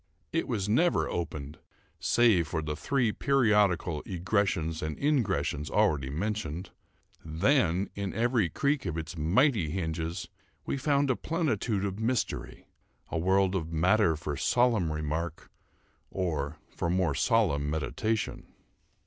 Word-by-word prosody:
It 165 - 0
was 105 -5 -1
never 165 +12 +2
opened 75 -3 -5 0.4
save 110 -9 +3
for 80 +2 -2
the 75 0 -3
three 125 - +1
periodical 105 - +2
egressions 90 -3 0
and 80 -1 -3
ingressions 110 - 0
already 70 -4 +2
mentioned; 90 +1 -3 0.5
then, 90 - +2
in 100 -2 -3
every 115 -4 +2
creak 140 - 0
of 85 -1 -3
its 80 +1 -5
mighty 90 - +2
hinges, 80 -1 -3 0.4
we - - -1
found 140 0 +2
a - - +1
plenitude 140 - -1
of 100 +1 -4
mystery—a 115 -6 -4
world 95 +2 +2
of 85 -4 -2
matter 90 +2 +3
for 75 -1 -4
solemn 115 - +2
remark, 75 +2 -4 0.6
or 80 -5 -2
for 85 - -2
more 90 -3 +1
solemn 70 +1 +2
meditation. 90 +9 -2
95 Hz, 125 wpm, -29 LUFS, 80-115 Hz, 0.6 s, save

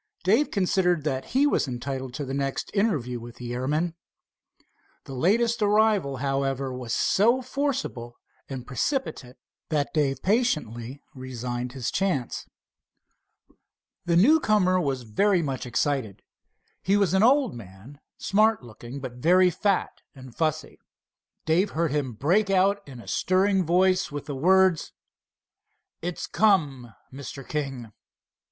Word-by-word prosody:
Dave 220 +11 +3
considered 180 -4 +1
that 135 -3 -2
he 270 +3 +2
was 290 - +1
entitled 130 +1 -4
to 145 - -4
the 135 - -5
next 135 -1 -3
interview 150 - 0
with 120 0 -10
the 120 -1 -6
airman. 150 +7 -1 1.1
The 135 - -9
latest 225 - +1
arrival, 210 -9 +2
however, 135 0 -1
was 125 -2 -6
so 235 - +2
forcible 255 - -3 0.3
and 130 -3 -6
precipitate 140 - -3 0.3
that 150 -3 -1
Dave 140 -3 0
patiently 145 - -1
resigned 125 -1 -5
his 130 -3 -3
chance. 180 -11 -2 1.6
The 170 -1 +1
newcomer 210 - +4
was 135 -5 -2
very 175 - +1
much 135 -3 -4
excited. 125 -5 -1 0.6
He 195 +2 +2
was 195 -4 +2
an 190 - +3
old 265 +2 +4
man, 110 +5 -12 0.2
smart 215 - +2
looking, 120 +3 -10
but 125 -2 -7
very 180 +6 +4
fat 200 +2 -1
and 130 -3 -12
fussy. 155 -1 -2 0.7
Dave 175 +6 +2
heard 165 -3 +1
him 140 -4 -1
break 180 - +1
out 195 +1 +3
in 130 -3 -10
a - - -13
stirring 190 -1 +1
tone 185 +2 +4 0.2
with 145 -1 -6
the 145 - -5
words: 185 +3 +3 1.1
"It's 175 0 -4
come, 145 - +1 0.2
Mr. 135 0 -8
King." 135 -7 -4
150 Hz, 130 wpm, -25 LUFS, 130-195 Hz, 1.6 s, newcomer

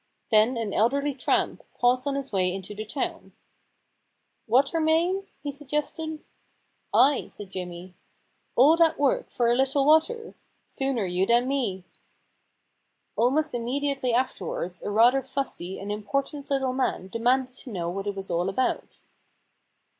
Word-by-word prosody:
Then 220 +3 +4
an 220 -3 -3
elderly 280 +6 +2
tramp 260 - 0 0.2
paused 250 +2 +2
on 280 - 0
his 275 -1 -4
way 185 -3 +1
into 190 +2 -6
the 215 +1 -6
town. 230 +6 -4 0.5
* - - -49
Water 270 +8 +3
main? 340 +5 +1
' - - -41
he 290 - -2
suggested. 300 +2 -4 0.4
* - - -46
Ay/ 280 0 +4
said 200 -2 -10
Jimmy. 180 -1 -7 0.3
* - - -45
All 285 +7 +7
that 330 -1 +4
work 280 -2 +1
for 240 - -1
a 235 - +4
little 270 +2 +2
water 440 +10 +3
I - - -17 0.3
Sooner 270 -6 -1
you 180 +1 0
than 240 +2 +3
me.' 225 -10 -1 1.3
Almost 290 +6 +2
immediately 260 +2 -1
afterwards 185 -7 -2
a - - -4
rather 235 +6 +5
fussy 190 -11 -4
and 200 +1 -5
important 275 +7 -3
little 265 -2 0
man 255 -7 -1
demanded 250 +4 +1
to 255 - -9
know 175 -4 -3
what 195 +3 -4
it 200 - -2
was 195 -2 -6
all 175 +2 0
about. 255 +7 -1
255 Hz, 155 wpm, -26 LUFS, 205-280 Hz, 1.3 s, All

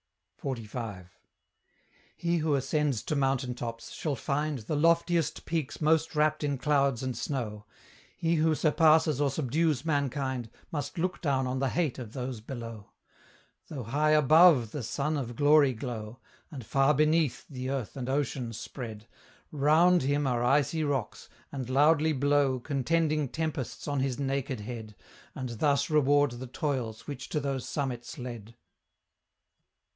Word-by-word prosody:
XLV. 110 -7 -5 1.1
He 170 0 0
who 155 -2 +1
ascends 140 -3 0
to 155 - -2
mountain 135 -2 0
tops, 115 -1 -6
shall 150 -3 -2
find 145 +4 -1
The 120 +6 -4
loftiest 170 +1 +2
peaks 160 -4 -3
most 160 +1 +2
wrapt 155 0 +2
in 140 -2 0
clouds 135 -2 +1
and 130 -2 -2
snow; 110 -5 -4 0.5
He 165 0 +1
who 155 0 +3
surpasses 155 -2 +4
or 145 - +3
subdues 150 +1 0
mankind, 135 -5 -1 0.2
Must 145 -1 -4
look 180 +2 -1
down 135 -4 +1
on 130 +1 -2
the 135 0 +1
hate 155 -5 -1
of 115 -3 -8
those 125 -3 -4
below. 115 -3 -8 0.8
Though 140 -5 -6
high 150 +7 +2
ABOVE 150 -5 +6
the 145 - -4
sun 140 +6 -2
of 120 -4 -4
glory 145 -1 +5
glow, 115 -1 -6 0.3
And 135 -9 -8
far 135 +5 +3
BENEATH 155 -1 +2
the 130 -2 -5
earth 135 -5 -3
and 130 -2 -4
ocean 130 -3 -1
spread, 110 -1 -7 0.5
ROUND 160 +5 +4
him 145 +2 +1
are 120 -2 0
icy 145 +5 +2
rocks, 135 -9 -3 0.2
and 130 -3 -5
loudly 150 +3 +4
blow 140 -1 +2
Contending 150 +2 0
tempests 155 -3 -4
on 145 -1 0
his 130 -2 -1
naked 135 -3 -2
head, 110 -1 -7 0.4
And 130 -2 -4
thus 140 0 +2
reward 145 -2 +4
the 120 +2 -7
toils 125 -5 -3
which 140 -3 -7
to 150 - 0
those 140 -2 -3
summits 130 -1 -4
led. 120 -3 -8
140 Hz, 145 wpm, -29 LUFS, 125-150 Hz, 1.1 s, ABOVE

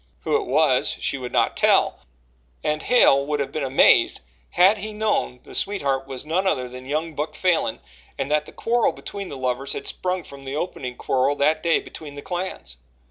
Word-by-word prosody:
Who - - 0
it 400 - -8
was, 145 -5 +3
she 140 - -2
would 125 -1 -6
not - - +2
tell, - - +3 0.6
and 150 0 0
Hale 140 - +5
would 150 -1 -1
have 140 - -2
been 155 - -3
amazed 135 0 +4 0.3
had 190 +4 +4
he 215 +2 -5
known 210 -12 -1
the - - -13
sweetheart 140 -9 -1
was 135 0 -6
none 180 +5 0
other 130 -9 0
than 125 +1 -10
young 155 +3 -2
Buck 150 +2 -4
Falin 175 -11 +1 0.4
and 135 +1 -3
that 150 0 +2
the - - -12
quarrel 235 0 +1
between 200 -2 -7
the 140 - -7
lovers 130 +1 -2
had - - -5
sprung 180 -1 -2
from 140 -2 -12
the 135 +1 -5
opening 130 -6 -4
quarrel 135 +2 +1
that 155 +3 +2
day 165 0 +3
between 145 -3 -10
the 145 - -8
clans. 175 - -5
150 Hz, 195 wpm, -23 LUFS, 135-180 Hz, 0.6 s, Hale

